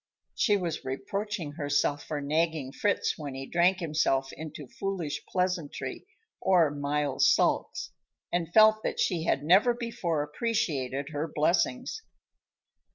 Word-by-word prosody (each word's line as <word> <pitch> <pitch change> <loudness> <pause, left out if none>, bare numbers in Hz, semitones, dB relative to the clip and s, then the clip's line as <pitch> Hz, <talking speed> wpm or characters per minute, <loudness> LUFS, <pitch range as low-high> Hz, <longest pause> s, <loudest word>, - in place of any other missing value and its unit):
She 210 -3 +3
was 175 -4 -3
reproaching 170 +6 -3
herself 145 -1 0
for 150 -2 -3
nagging 155 -1 0
Fritz 200 +4 0
when 145 -3 -5
he 135 0 -5
drank 175 +4 +2
himself 150 -5 0
into 155 -2 -8
foolish 180 -2 -4
pleasantry 180 -5 -2 0.3
or 175 -5 +4
mild 145 -1 -1
sulks, 135 - +2 0.4
and 170 -2 -1
felt 215 +2 +6
that - - -3
she 165 -3 +1
had 140 - +1
never 195 +10 +5
before 180 -10 -2
appreciated 145 - -2
her 155 +1 -3
blessings. 180 - 0
160 Hz, 125 wpm, -28 LUFS, 145-190 Hz, 0.4 s, felt